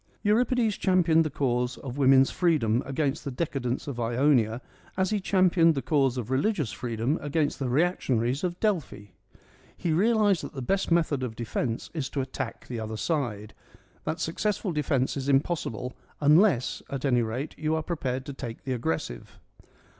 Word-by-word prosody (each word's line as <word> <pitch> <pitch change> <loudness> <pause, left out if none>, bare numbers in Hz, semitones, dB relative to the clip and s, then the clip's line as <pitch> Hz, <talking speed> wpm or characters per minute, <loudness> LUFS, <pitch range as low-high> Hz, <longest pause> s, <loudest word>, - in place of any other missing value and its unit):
Euripides 225 0 +2
championed 170 -3 +3
the 155 - -2
cause 125 -3 -1
of 130 -3 -7
woman's 135 -1 +5
free 170 -3 +2
dom 115 -2 +1
against 140 0 -1
the - - -3
decadents 130 -2 -3
of 135 -4 -5
Ionia 120 -1 +2 0.4
as 190 +1 +1
he 210 - +1
championed 185 -4 +3
the 135 - -1
cause 135 -3 +2
of 120 0 -4
religious 150 - +1
freedom 120 +5 -2
against 145 +1 -1
the 135 -3 -1
reaction 150 -2 +1
aries 120 +7 -1
of 175 -1 -2
Delphi. 160 - -2 0.7
He 165 - -1
realised 205 0 +3
that - - -7
the 135 - -4
best 195 +9 0
method 160 -5 +2
of 120 -3 -4
defence 115 0 -3
is 150 -6 -3
to 140 - -2
attack 130 -2 -5
the 120 -2 -5
other 110 0 -4
side: 110 -9 -2 0.5
that 160 - -3
successful 200 +3 -1
defence 140 -4 0
is 140 0 -3
impossible, 135 -4 0 0.3
unless 150 - +4
at 140 0 -4
any 125 -3 +3
rate 120 +6 -3
you 155 0 -1
are 160 - -1
prepared 135 -6 -3
to 140 - -6
take 120 -4 -7
the 130 - -2
aggressive. 80 - -4
140 Hz, 170 wpm, -27 LUFS, 125-170 Hz, 0.7 s, woman's